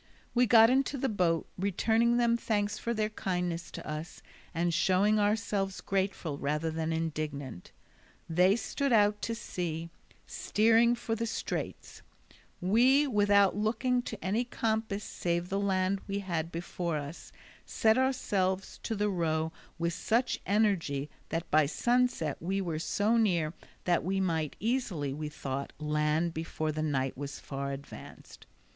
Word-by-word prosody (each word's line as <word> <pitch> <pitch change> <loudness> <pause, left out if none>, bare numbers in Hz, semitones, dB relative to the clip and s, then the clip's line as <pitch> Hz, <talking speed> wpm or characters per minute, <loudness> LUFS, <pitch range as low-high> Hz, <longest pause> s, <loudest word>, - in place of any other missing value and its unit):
We 245 0 +4
got 225 0 +7
into 270 +2 +1
the 270 - 0
boat, 175 -6 +1
returning 225 +5 +2
them 235 -1 +3
thanks 210 -3 -1
for 235 - -2
their 215 -2 0
kindness 180 -4 -2
to - - -8
us, 155 +2 -6 0.3
and 170 0 0
showing 200 +5 +3
ourselves 205 -2 0
grateful 190 -6 -2
rather 150 +3 -1
than 160 0 -2
indignant. 150 - -4 0.6
They 180 +4 +4
stood 275 +3 -2
out 210 -2 +4
to 230 - -2
sea, 170 -6 -4 0.3
steering 230 +2 +3
for 225 -1 -3
the 230 +1 -1
straits; - - -4 0.6
we, 245 +10 +4
without 205 -5 +4
looking 235 +4 +1
to 220 -5 -7
any 210 +6 +1
compass 220 -3 -2
save 175 0 -2
the 195 - 0
land 195 -1 +1
we 200 0 -2
had 170 -4 -2
before 170 -1 -3
us, 145 +3 -7 0.3
set 220 0 +2
ourselves 200 -8 0
to 225 - -3
row 160 -4 0 0.3
with 170 0 -1
such 235 +6 0
energy 185 -9 +1 0.2
that 165 +1 -3
by 155 -1 +5
sunset 240 - +1
we 190 +4 -1
were 170 -5 -2
so 210 +7 +1
near 170 -8 +2 0.3
that 175 -1 +2
we 190 +3 0
might 160 -5 -1
easily, 210 - -1
we 150 +1 -4
thought, 140 -1 -5
land 150 +2 0
before 160 -1 -3
the 155 +1 -3
night 135 -4 0
was 140 +1 -6
far 140 0 -4
advanced. 140 +1 -10
190 Hz, 145 wpm, -30 LUFS, 160-220 Hz, 0.6 s, got